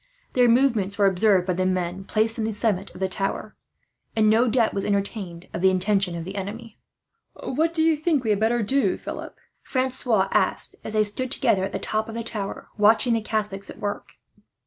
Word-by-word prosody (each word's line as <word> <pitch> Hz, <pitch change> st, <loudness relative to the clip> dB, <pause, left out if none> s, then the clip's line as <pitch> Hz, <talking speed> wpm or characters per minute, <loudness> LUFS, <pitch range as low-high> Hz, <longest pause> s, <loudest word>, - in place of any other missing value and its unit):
Their 245 Hz, -1 st, +4 dB
movements 230 Hz, -6 st, +2 dB
were 205 Hz, -, +3 dB
observed 190 Hz, -1 st, +3 dB
by 185 Hz, -, 0 dB
the 185 Hz, +1 st, -1 dB
men 185 Hz, +1 st, -2 dB
placed 225 Hz, +2 st, +1 dB
on 220 Hz, -, 0 dB
the 220 Hz, -, -2 dB
summit 205 Hz, -2 st, -1 dB
of -, -, -10 dB
the 190 Hz, -, 0 dB
tower, 195 Hz, +3 st, -3 dB, 0.6 s
and 215 Hz, -1 st, +4 dB
no 230 Hz, +3 st, +4 dB
doubt 235 Hz, -1 st, +2 dB
was 195 Hz, -, -2 dB
entertained 200 Hz, -4 st, -3 dB
of -, -, -4 dB
the 190 Hz, -, +5 dB
intentions 190 Hz, -1 st, +1 dB
of 165 Hz, -, -6 dB
the 195 Hz, +2 st, -6 dB
enemy. 215 Hz, +3 st, -7 dB, 0.6 s
"What 315 Hz, +5 st, -1 dB
do 325 Hz, -1 st, +1 dB
you 325 Hz, 0 st, +4 dB
think 300 Hz, -3 st, 0 dB
we 220 Hz, -, +1 dB
had 205 Hz, -, +1 dB
better 230 Hz, +1 st, +1 dB
do, 275 Hz, -, +1 dB
Philip?" -, -, -7 dB, 0.2 s
Francois 255 Hz, -6 st, 0 dB
asked, -, -, +1 dB
as 215 Hz, -, -6 dB
they 215 Hz, -1 st, +3 dB
stood 230 Hz, +5 st, 0 dB
together 195 Hz, -7 st, +2 dB
at 195 Hz, -, -2 dB
the -, -, -2 dB
top 215 Hz, +1 st, -2 dB
of 225 Hz, -, -7 dB
the 230 Hz, -, -3 dB
tower, 210 Hz, -3 st, -4 dB
watching 225 Hz, +3 st, +4 dB
the 225 Hz, -, +1 dB
Catholics 210 Hz, -2 st, -3 dB
at -, -, -9 dB
work. 205 Hz, -1 st, -5 dB
215 Hz, 210 wpm, -24 LUFS, 195-235 Hz, 0.6 s, the